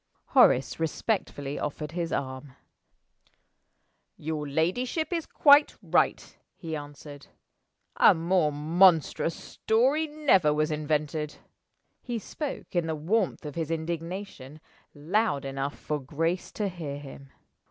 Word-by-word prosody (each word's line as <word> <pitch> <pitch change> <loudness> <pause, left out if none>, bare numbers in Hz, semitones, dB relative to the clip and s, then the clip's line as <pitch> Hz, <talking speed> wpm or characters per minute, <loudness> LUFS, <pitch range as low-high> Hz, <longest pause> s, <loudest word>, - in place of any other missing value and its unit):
Horace 130 +5 +4
respectfully 155 -4 -2
offered 150 +1 -4
his 170 -1 -3
arm. 130 0 -4 1.6
"Your 155 -1 -4
ladyship 245 - -1
is 330 -2 -2
quite 290 0 +5
right," - - 0 0.2
he 160 -3 -5
answered. 145 -1 -10 0.7
"A - - +7
more 165 -1 +1
monstrous 165 +2 +3
story 265 +8 +1
never 270 - +3
was 155 +1 +1
invented." 150 0 -2 0.7
He 240 -2 -4
spoke, 275 - -6
in 170 -2 +1
the 160 - -1
warmth 180 +3 -1
of 150 - -5
his 160 0 -3
indignation, 165 -2 -5 0.4
loud 160 0 0
enough 135 +1 -4
for 150 -1 -3
Grace 165 +6 -2
to 210 - -1
hear 165 -7 -5
him. 140 -1 -11
160 Hz, 115 wpm, -27 LUFS, 145-190 Hz, 1.6 s, A